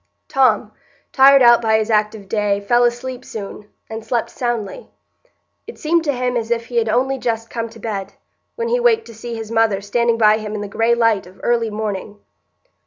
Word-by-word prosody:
Tom, 250 -6 +2 0.4
tired 275 0 +7
out 240 0 +6
by 220 -1 +2
his 220 +1 -1
active 210 -1 0
day, 205 -1 0
fell 240 +4 +2
asleep 245 +1 -3
soon, 210 -2 -8 0.2
and 220 0 -7
slept 230 +1 -2
soundly; 240 - -4 0.8
it 460 - -10
seemed 330 +2 +1
to 290 - +2
him 250 -1 -2
as 230 -1 -2
if 235 -1 -1
he 240 +1 -5
had 225 -1 +1
only 265 +4 0
just 230 -2 -3
come 230 -1 -4
to 225 - -14
bed, 200 -3 -5 0.4
when 465 0 -3
he - - +1
waked 460 -2 +2
to 230 - -12
see 230 +2 -7
his 225 -1 -7
mother 225 -3 +2
standing 230 +3 0
by 215 -1 +4
him 215 0 -6
in 210 - -4
the 205 - -5
gray 225 +4 +1
light 225 -5 +1
of 185 +1 -17
early 235 -1 +1
morning. 210 -1 -5
230 Hz, 200 wpm, -19 LUFS, 215-245 Hz, 0.8 s, tired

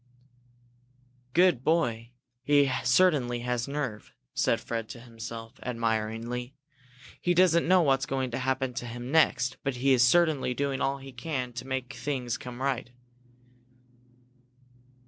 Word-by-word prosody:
"Good 175 -7 +4
boy! 120 -8 +1 0.3
He 145 0 +3
certainly 130 -3 +3
has 125 0 -2
nerve!" 135 -7 -4 0.2
said - - +1
Fred 115 -2 -4
to 120 - -8
himself, 115 0 -9
admiringly. 115 +2 -2 0.7
"He 175 0 +1
doesn't 170 -2 +4
know 185 0 +5
what's 135 -1 +2
going 130 -2 -2
to 120 - -2
happen 130 0 -1
to 120 0 -5
him 120 +2 -6
next, 130 -5 +3
but 135 -2 -1
he 135 +2 +3
is 125 - +4
certainly 150 -2 +3
doing 140 -1 -1
all 135 +1 0
he 135 0 -10
can 125 -1 -4
to 125 +2 -7
make 130 0 -3
things 130 -5 -3
come 125 +1 -7
right." 130 -3 -1
130 Hz, 135 wpm, -28 LUFS, 120-140 Hz, 0.7 s, know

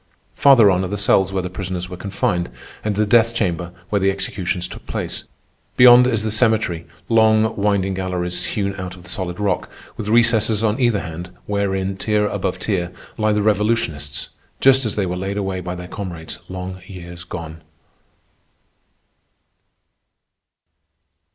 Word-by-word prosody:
Farther 120 -8 +6
on 90 0 +1
are - - -2
the 105 +2 -3
cells 95 -1 +3
where 95 -1 -1
the 90 - -3
prisoners 90 -1 -4
were 90 - -7
confined, 90 -3 -1 0.3
and 105 -1 -1
the 105 +1 +2
death 115 +2 +4
chamber 90 -5 -1 0.2
where 100 - +2
the 95 0 +3
executions 95 -2 -2
took - - -11
place. - - -3 0.5
Beyond 125 0 +8
is 115 -4 0
the 110 - -1
cemetery—long, 110 0 +2
winding 100 -2 +1
galleries 90 -1 -2
hewn 100 -1 -2
out 90 -1 -6
of 90 - -14
the 90 - -9
solid 90 -1 -4
rock, 100 -3 -1 0.3
with - - -5
recesses 115 -1 +3
on 110 +3 +1
either 120 -5 +2
hand, 90 +1 -7 0.2
wherein, 95 -1 -1
tier 105 +1 +1
above 95 -3 -2
tier, 90 -4 -2 0.3
lie 110 0 +2
the 105 0 +1
revolutionists 100 -9 0 0.3
just 135 -2 +5
as 110 - -4
they 100 - 0
were 90 0 -2
laid 95 +2 -3
away 95 -2 -2
by 90 0 -4
their 90 0 -7
comrades 90 -5 -7
long 95 0 -6
years 90 -2 -9
agone. 80 -2 -7
95 Hz, 155 wpm, -20 LUFS, 90-105 Hz, 0.5 s, Beyond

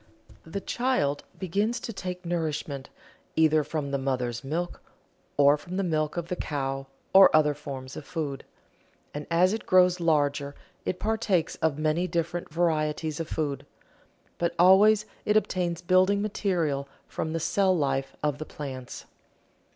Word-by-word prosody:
The 195 +5 -4
child 240 - 0
begins 205 +6 -1
to 230 - -5
take 180 -2 -6
nourishment 155 -5 -3 0.5
either 155 -1 +4
from 145 -2 -3
the 140 - 0
mother's 125 -3 -2
milk 165 +6 -3 0.6
or 145 +1 +6
from 175 +5 -7
the 195 - +1
milk 155 -2 -1
of 170 -1 -2
the 180 - -2
cow, 135 -4 -3 0.3
or 190 0 +9
other 150 -1 +4
forms 135 -3 -8
of - - -7
food. 150 -5 -4 0.7
And 145 0 -6
as 180 +3 +4
it 220 - -5
grows 180 -1 +5
larger 145 -3 +1 0.3
it 185 - -1
partakes 210 -6 0
of 160 -3 0
many 155 +4 +1
different 170 -1 -2
varieties 155 -2 0
of 165 - -3
food. 140 -4 -2 0.8
But 170 - 0
always 205 +4 +6 0.2
it 210 0 +3
obtains 180 -4 -1
building 185 +3 +4
material 170 -9 -1 0.2
from 160 - -4
the 165 - -1
cell 190 +3 +2
life 135 -2 -1
of 150 -2 0
the 155 - -4
plants. 130 -5 -7
160 Hz, 150 wpm, -27 LUFS, 145-185 Hz, 0.8 s, or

